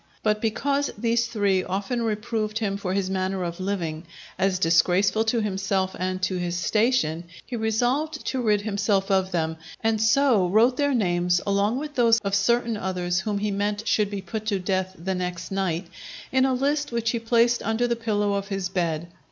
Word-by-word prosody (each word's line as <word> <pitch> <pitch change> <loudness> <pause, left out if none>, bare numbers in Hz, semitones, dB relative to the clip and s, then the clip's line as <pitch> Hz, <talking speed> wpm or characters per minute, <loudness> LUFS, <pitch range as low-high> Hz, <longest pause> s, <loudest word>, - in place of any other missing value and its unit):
But 215 -1 +1
because 280 +6 0
these 235 +1 +1
three 200 -5 +1
often 200 +7 -2
reproved 215 -1 -2
him 205 -3 -1
for 195 -2 -3
his 195 -1 0
manner 190 0 -1
of 170 0 -4
living, 170 -4 -3 0.3
as 190 -1 +2
disgraceful 185 +5 +3
to 225 +1 +1
himself 190 -2 -1
and 185 0 -1
to 185 0 0
his 175 -1 -2
station, 185 -3 +1 0.2
he 250 - -5
resolved 245 +8 0
to 260 -1 -1
rid 210 -3 +2
himself 200 -1 0
of 190 -1 +2
them; 160 -2 -1 0.3
and 220 -1 +1
so 220 -4 +4
wrote 225 +7 +4
their 285 0 +1
names, 175 -4 +2
along 200 +4 +1
with 295 +1 -5
those 230 -3 +4
of 200 -1 -3
certain 230 +3 +2
others 180 -2 -1
whom 205 +1 -2
he 205 +1 -1
meant 205 +2 -2
should 205 0 +2
be 200 -2 -5
put 215 +2 -5
to 205 -2 +1
death 185 0 -2
the 190 +3 -3
next 180 -1 -4
night, 190 -2 -1 0.5
in 260 0 +3
a 265 - +2
list 290 +2 0
which 230 -1 0
he 235 - -1
placed 235 +1 +2
under 225 +2 0
the 235 - 0
pillow 210 -3 0
of 200 0 -2
his 195 -2 -3
bed. 170 -3 -1
205 Hz, 190 wpm, -25 LUFS, 185-230 Hz, 0.5 s, so